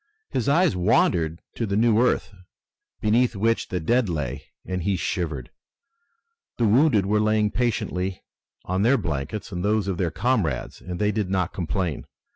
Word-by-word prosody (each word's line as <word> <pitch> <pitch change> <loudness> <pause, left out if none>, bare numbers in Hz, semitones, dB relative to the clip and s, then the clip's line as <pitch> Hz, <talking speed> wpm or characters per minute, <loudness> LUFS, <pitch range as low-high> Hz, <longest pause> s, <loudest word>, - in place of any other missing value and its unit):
His 125 +1 0
eyes 165 - +3
wandered 90 -4 +2
to 115 - -3
the 100 - -1
new 115 +1 +4
earth, 125 -4 +1 0.7
beneath 115 +2 +2
which 115 +3 +1
the 90 - -2
dead 115 +6 +1
lay, 70 -4 -3 0.2
and 90 -1 -3
he 95 +3 0
shivered. 80 -9 -3 1.1
The 120 - +2
wounded 110 -2 +4
were 105 +2 +2
lying 105 -1 +2
patiently 95 -6 -2 0.4
on 95 +1 -1
their 125 +6 +4
blankets 85 +3 -4
and 90 -1 -4
those 105 -1 +1
of 95 -3 -2
their 90 -3 +1
comrades 100 - -1
and 90 0 -6
they 105 +1 +1
did 105 -3 -2
not 95 -2 0
complain. 90 -3 -2
100 Hz, 160 wpm, -24 LUFS, 90-110 Hz, 1.1 s, new